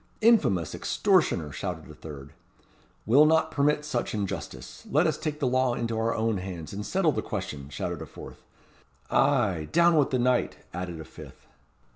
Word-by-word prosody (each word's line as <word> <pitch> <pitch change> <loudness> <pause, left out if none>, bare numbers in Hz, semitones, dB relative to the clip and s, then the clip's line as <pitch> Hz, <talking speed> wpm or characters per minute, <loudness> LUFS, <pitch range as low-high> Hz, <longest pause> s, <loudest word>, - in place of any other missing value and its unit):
"Infamous 150 - +3
extortioner!" 75 -2 +1
shouted - - -5
a - - -11
third. 70 -3 -10 0.7
"We'll 140 +8 +6
not 160 0 +3
permit 150 0 +1
such 120 -6 -2
injustice. 95 - -5
Let 155 +5 +3
us 155 - +2
take 155 -1 -4
the 140 - 0
law 130 -1 +2
into 115 -1 -2
our 115 +1 0
own 110 -1 0
hands, 90 -3 -7
and 105 +1 -4
settle 180 - +1
the - - -2
question!" 75 -9 -5
shouted 70 - -4
a - - -7
fourth. - - -11 0.7
"Ay, 110 - +2
down 170 +1 +5
with 145 -3 +3
the 130 - +1
knight!" 125 0 +1 0.2
added 90 -1 -5
a 80 - -8
fifth. - - -13
120 Hz, 170 wpm, -27 LUFS, 90-150 Hz, 0.7 s, We'll